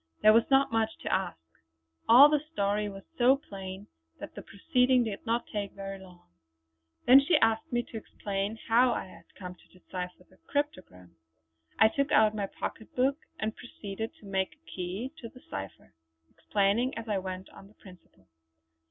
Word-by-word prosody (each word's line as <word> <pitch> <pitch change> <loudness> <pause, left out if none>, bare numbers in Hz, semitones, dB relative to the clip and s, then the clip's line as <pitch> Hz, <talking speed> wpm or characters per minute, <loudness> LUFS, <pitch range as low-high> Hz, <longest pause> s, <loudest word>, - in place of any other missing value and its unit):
There 215 - +8
was 230 +1 +4
not 270 -1 +4
much 225 -1 +2
to - - -1
ask; 80 - -1 0.7
all 255 +5 +10
the 300 0 +2
story 205 -4 0
was 195 -1 -10 0.2
so 250 +2 +6
plain 195 -6 -8 0.3
that - - -8
the - - -8
proceeding 250 +4 +2
did 215 -4 -5
not 235 +1 0
take 205 -2 -3
very 195 0 -7
long. 180 -2 -15 0.8
Then 260 +2 +9
she 295 +3 +3
asked 225 -4 +1
me 240 0 +1
to 230 - -9
explain 205 0 -4
how 240 +2 +4
I - - -3
had 185 - -15
come 180 -2 -7
to 180 - -23
decipher 180 0 -7
the 185 - -24
cryptogram. 135 - -4 0.6
I 220 - +7
took 280 +5 -1
out 215 -1 +5
my 205 -2 -2
pocket 220 - -7
book 270 +4 +2 0.2
and 215 0 -2
proceeded 220 -2 -7
to - - -18
make 195 +6 -2
a 315 +2 -42
key 190 +8 -4
to 230 - -8
the 255 - -16
cipher, 95 -9 -7 0.4
explaining 210 +6 0
as 230 0 -6
I 205 -3 0
went 185 0 -6
on 195 - -14
the 210 - -22
principle. 180 - -18
210 Hz, 180 wpm, -29 LUFS, 190-240 Hz, 0.8 s, all